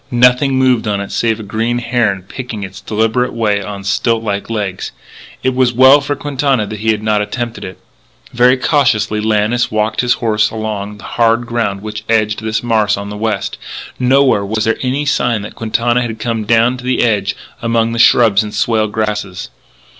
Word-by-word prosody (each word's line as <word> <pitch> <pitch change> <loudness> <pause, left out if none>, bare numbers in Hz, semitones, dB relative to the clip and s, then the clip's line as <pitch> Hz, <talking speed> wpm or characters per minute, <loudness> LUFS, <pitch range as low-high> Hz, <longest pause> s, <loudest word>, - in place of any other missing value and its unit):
Nothing 125 +3 +3
moved 130 -3 +2
on 100 -1 0
it 100 - -6
save 115 -1 0
a - - -6
great 115 +4 -1
heron 115 -6 0
picking 115 +1 -7
its 95 +1 -8
deliberate 110 +4 0
way 105 -3 0
on 100 0 -7
stilt 115 +3 0
like 100 -1 -3
legs. 105 -5 -3 0.5
It 130 - +1
was 125 -1 +2
well 130 +4 +6
for 145 +1 -2
Quintana 140 -5 0
that 105 0 -7
he 110 +2 -1
had 110 -1 0
not 105 -1 +1
attempted 120 +2 -4
it. 95 - -8 0.6
Very 125 +1 +4
cautiously 115 -7 +1
Lannis 110 +3 +1
walked 110 0 0
his 125 0 +2
horse 110 -3 +1
along 105 -2 -5
the 105 - -14
hard 115 0 +1
ground 115 -5 -2
which 105 0 -6
edged 110 -1 +1
this 110 0 -2
marsh 110 -4 +1
on 100 0 -6
the - - -6
west. 110 +1 -3 0.4
Nowhere 130 -4 +3
was 110 +2 -2
there 115 - 0
any 135 +3 -1
sign 120 -6 0
that 105 - -8
Quintana 120 +2 0
had 115 -2 -4
come 110 -1 -2
down 115 +3 +3
to 125 - -11
the 130 0 +1
edge 105 -4 0 0.3
among 115 -1 +1
the 115 - -3
shrubs 115 -4 +5
and 105 -1 -6
swale 110 0 +1
grasses. 105 -3 -3
110 Hz, 190 wpm, -15 LUFS, 105-120 Hz, 0.6 s, well